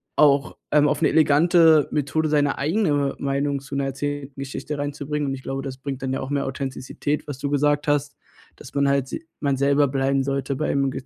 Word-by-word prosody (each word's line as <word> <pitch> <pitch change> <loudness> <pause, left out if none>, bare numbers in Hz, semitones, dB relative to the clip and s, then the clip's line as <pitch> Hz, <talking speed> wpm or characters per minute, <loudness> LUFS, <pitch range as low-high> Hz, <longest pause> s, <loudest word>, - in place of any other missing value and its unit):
auch, 140 -2 +3 0.2
ähm, 150 0 +5
auf 150 +1 0
'ne 160 - +4
elegante 160 0 +5
Methode 155 +2 0
seine 145 -2 +1
eigene 145 -3 +1
Meinung 140 0 -1
zu 140 0 -8
'ner 140 0 0
erzählten 140 0 -4
Geschichte 140 +2 -5
reinzubringen. 145 +1 -3
Und - - -2
ich 135 - -6
glaube, 135 0 -4
das 130 -1 -6
bringt 135 -1 -5
dann 130 0 -1
ja 135 - -2
auch 130 - -5
mehr 140 -1 -1
Authentizität, 135 +2 -3
was 140 -3 -6
du 140 - -2
gesagt 145 +1 +1
hast, 145 0 0 0.4
dass - - -12
man 140 0 +2
halt 140 -1 +1
se - - -5 0.2
man 140 -2 0
selber 140 +1 +3
bleiben 135 0 +1
sollte 140 0 -2
beim 140 -1 0
140 Hz, 200 wpm, -23 LUFS, 135-145 Hz, 0.4 s, ähm